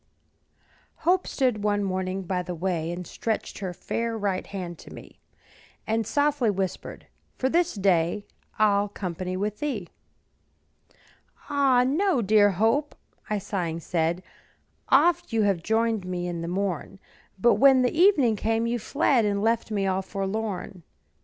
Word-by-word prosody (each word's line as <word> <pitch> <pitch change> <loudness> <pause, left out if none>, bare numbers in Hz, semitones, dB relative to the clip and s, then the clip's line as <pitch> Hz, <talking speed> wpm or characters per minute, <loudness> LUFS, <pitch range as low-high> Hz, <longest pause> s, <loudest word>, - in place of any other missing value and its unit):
Hope 365 +2 +3
stood 250 -6 0
one 205 -1 +1
morning 185 0 -2
by 180 0 -1
the 180 0 -5
way, 170 -1 -2
And 175 +1 -5
stretched 220 +6 -3
her 190 -3 -3
fair 230 +5 -3
right 200 -3 -2
hand 180 -4 -6
to - - -12
me, - - -12 0.7
And 220 -1 -1
softly 285 -5 +2
whispered, 190 -2 -4 0.3
"For 260 - 0
this 345 0 +1
day 190 0 +1 0.3
I'll 205 -1 +3
company 185 -2 -4
with 210 +2 -3
thee." 235 - -3 1.6
"Ah, 270 -3 +4
no, 305 - +1
dear 205 0 +5
Hope," 225 - +1 0.3
I 210 - 0
sighing 175 -4 -3
said; 170 +2 -1 0.7
"Oft 340 +5 +4
have 205 -4 +2
you - - -14
joined 225 +1 0
me 180 -1 -3
in 170 -1 -4
the 170 - -4
morn, 190 0 -3 0.4
But 235 +5 +4
when 265 -2 +7
the 250 - 0
evening 310 - +4
came, 225 +2 0
you 240 +1 -1
fled 270 0 +2
And 205 -1 0
left 230 0 +1
me 205 -2 -1
all 190 0 0
forlorn. 195 -1 -4
205 Hz, 145 wpm, -26 LUFS, 185-235 Hz, 1.6 s, when